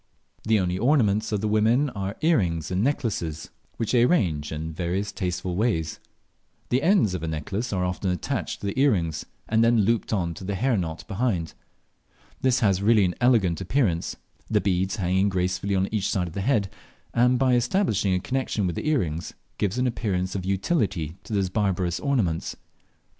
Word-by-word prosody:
The 110 -1 +3
only 90 0 -1
ornaments 110 -5 +2
of 105 -2 0
the 110 - 0
women 115 +7 +2
are 100 -1 -4
earrings 90 - +1
and 95 +3 +1
necklaces, 100 - -2 0.3
which 115 - -1
they 120 - +4
arrange 85 - +2
in 80 +1 -4
various 90 +4 -2
tasteful 90 -2 -3
ways. 90 -7 0 0.7
The 125 +2 +2
ends 165 - +3
of 90 - -3
a 80 - -3
necklace 95 +9 -3
are 90 -2 0
often 90 +1 -2
attached 90 - -3
to - - -5
the 100 +6 -2
earrings, 85 - +1 0.2
and 110 +1 +3
then 115 -1 +4
looped 115 +3 +1
on 90 -6 0
to 90 - -10
the 100 +1 -2
hair 125 +5 +1
knot 85 -5 -4
behind. 95 -6 -1 0.9
This 130 0 +2
has 100 -4 +2
really 105 -1 +4
an 90 - 0
elegant 105 -9 +3
appearance, 95 -4 0 0.3
the - - +3
beads 95 0 0
hanging 95 0 +1
gracefully 95 +1 -1
on 95 0 +1
each 105 -3 0
side 90 -2 0
of 85 - -9
the 100 - -3
head, 105 -4 +1 0.4
and 125 +1 +4
by 130 0 +3
establishing 120 - +2
a - - +1
connexion 125 -2 -1
with 90 -3 -1
the 150 - -2
earrings 85 - -1 0.2
give 100 +2 0
an 125 - +1
appearance 95 -7 -1
of 95 -2 -3
utility 95 - -1
to - - -11
those 100 -3 +1
barbarous 90 -3 0
ornaments. 110 - 0
100 Hz, 180 wpm, -25 LUFS, 90-115 Hz, 0.9 s, they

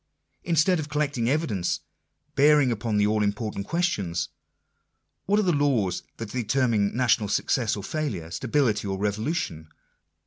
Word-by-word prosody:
Instead 170 +1 +3
of 150 -1 -5
collecting 145 -5 0
evidence 120 - 0 0.5
bearing 145 -2 +5
upon 110 -1 -1
the 105 - +4
all 105 +1 +1
important 105 -1 -2
question 165 - -1 0.5
— - - -51
What 205 +2 +3
are - - +2
the 180 - +2
laws 130 - +1 0.2
that 115 -2 -6
determine 115 -4 +1
national 120 -4 +2
success 115 +2 +1
or 100 - -6
failure, 105 - -3
stability 115 -3 0
or 95 0 -2
revolution? 100 - -2
115 Hz, 140 wpm, -26 LUFS, 105-150 Hz, 0.5 s, bearing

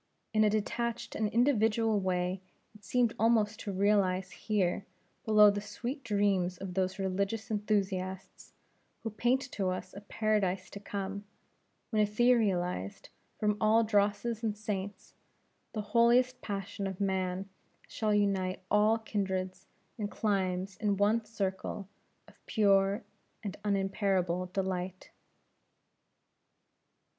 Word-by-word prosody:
In 215 0 +4
a 210 - +5
detached 235 +3 -2
and 215 -1 0
individual 225 -2 +3
way, 185 0 -1 0.3
it 210 -1 -18
seemed 235 +3 +2
almost 220 -2 +3
to 205 - -4
realize 190 -2 +2
here 200 -3 -1 0.4
below 210 -1 +7
the 205 0 -3
sweet 235 +7 -5
dreams 200 -4 +1
of 190 0 -6
those 190 +1 0
religious 200 +3 -2
enthusiasts, 195 -3 -2 0.5
who 225 - -3
paint 245 +5 +2
to 195 -2 -1
us 185 - -4
a 200 - -9
Paradise 205 -3 0
to 200 - -7
come, 200 0 -5 0.7
when 215 -2 +3
etherealized 205 - +1 0.3
from 210 -1 +2
all 220 +1 +5
drosses 210 +1 +1
and 215 -2 -1
stains, 200 -1 -5 0.6
the 215 - -2
holiest 250 +2 +4
passion 200 0 -4
of 190 -2 -6
man 190 -1 -1 0.4
shall 215 -1 -1
unite 195 -3 +1
all 210 +2 +4
kindreds 190 -4 -3 0.3
and 205 -1 -2
climes 190 -3 -1
in 205 -2 0
one 215 +3 +3
circle 195 -2 -3 0.4
of - - -21
pure 200 0 +3 0.4
and 200 -3 -4
unimpairable 195 -3 0
delight. 185 -1 -3
205 Hz, 120 wpm, -31 LUFS, 190-215 Hz, 0.7 s, below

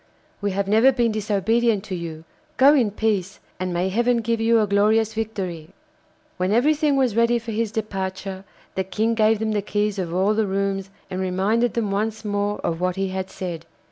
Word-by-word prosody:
'We 205 0 0
have 200 0 -1
never 220 +6 +5
been 240 -3 +1
disobedient 215 +1 +1
to 215 - -7
you. 165 -2 -6 0.3
Go 275 +2 +7
in 250 -8 +3
peace, 205 -2 -1 0.2
and 185 0 -2
may 175 +2 0
heaven 240 +4 +2
give 230 0 -1
you 230 0 +4
a 215 - +3
glorious 210 +2 +2
victory!' 195 -8 -4 0.7
When 185 +1 0
everything 290 +5 +3
was 255 -5 +1
ready 235 +1 +3
for 230 0 -6
his 220 0 -1
departure, 190 -3 -4 0.3
the 190 - -1
King 220 +4 0
gave 220 0 +3
them 220 +1 -1
the 210 -1 0
keys 205 0 -1
of 175 -3 -3
all 190 +4 +2
the 215 -1 +1
rooms 195 0 -1 0.2
and 185 0 -2
reminded 200 +6 +1
them 220 -4 -1
once 215 +2 -2
more 205 0 -1
of 165 0 -2
what 180 0 0
he 195 0 -1
had 190 0 -4
said. 175 -4 -6
205 Hz, 195 wpm, -23 LUFS, 190-225 Hz, 0.7 s, Go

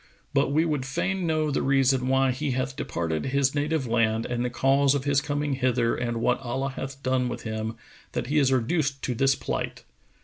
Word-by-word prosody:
But 140 0 +2
we 155 +3 +3
would 150 -5 -1
fain 180 +7 -1
know 155 -1 +1
the - - 0
reason 135 -1 +2
why 135 0 +3
he 140 +3 -2
hath 130 +1 -2
departed 80 -1 -2
his 140 0 +2
native 150 0 0
land 115 -1 +1
and 120 0 -2
the 125 - 0
cause 135 +3 +3
of 140 - -1
his 140 -1 +2
coming 145 0 -1
hither 125 -3 +1
and 120 -1 -2
what 120 +2 +1
Allah 135 +2 -2
hath 135 +1 -7
done 130 -1 +1
with 120 0 -6
him, 110 0 -3 0.4
that - - -2
he 145 +4 +2
is 135 -2 +3
reduced 135 +2 0
to 125 - -1
this 135 +3 +3
plight?" - - -4
135 Hz, 205 wpm, -26 LUFS, 125-140 Hz, 0.4 s, we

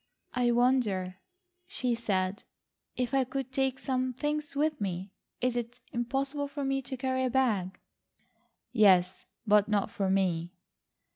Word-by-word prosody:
"I 245 -1 +2
wonder," 235 -7 +2 0.5
she 250 -2 -1
said, 200 -4 -1 0.5
"if 250 0 -2
I 270 -1 +4
could 265 0 -4
take 265 0 0
some 255 -1 -1
things 295 +2 -2
with 300 -2 0
me. 190 0 -3 0.3
Is 250 -1 +1
it 240 0 -4
impossible 270 +4 -1
for 280 0 -4
me 270 0 0
to 260 0 -6
carry 260 0 0
a 255 - +1
bag?" 220 -8 +1 0.9
"Yes, 190 -6 +4 0.2
but 210 -1 +5
not 205 -2 +1
for 195 -2 -1
me." 180 -3 +1
245 Hz, 140 wpm, -30 LUFS, 200-265 Hz, 0.9 s, but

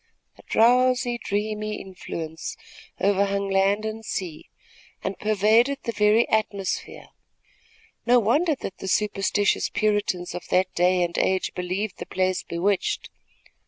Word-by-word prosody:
A - - -17
drowsy, 245 +1 +3
dreamy 215 +1 -2
influence 170 - -7 0.4
overhung 200 0 +1
land 195 +2 +2
and 220 +1 -5
sea 175 -7 -5 0.5
and 195 - -2
pervaded 215 +6 +3
the 230 - -2
very 210 +2 +3
atmosphere. 205 -3 -2 1.0
No 245 +1 +6
wonder 290 - +2
that 195 - -7
the 190 - -6
superstitious 205 0 +1
Puritans 205 -4 0
of 175 - -7
that 185 0 +2
day 180 +1 +3
and 170 0 -3
age 190 0 0
believed 185 +3 -3
the - - -6
place 185 0 0
bewitched. 185 +3 -1
205 Hz, 125 wpm, -24 LUFS, 190-220 Hz, 1.0 s, No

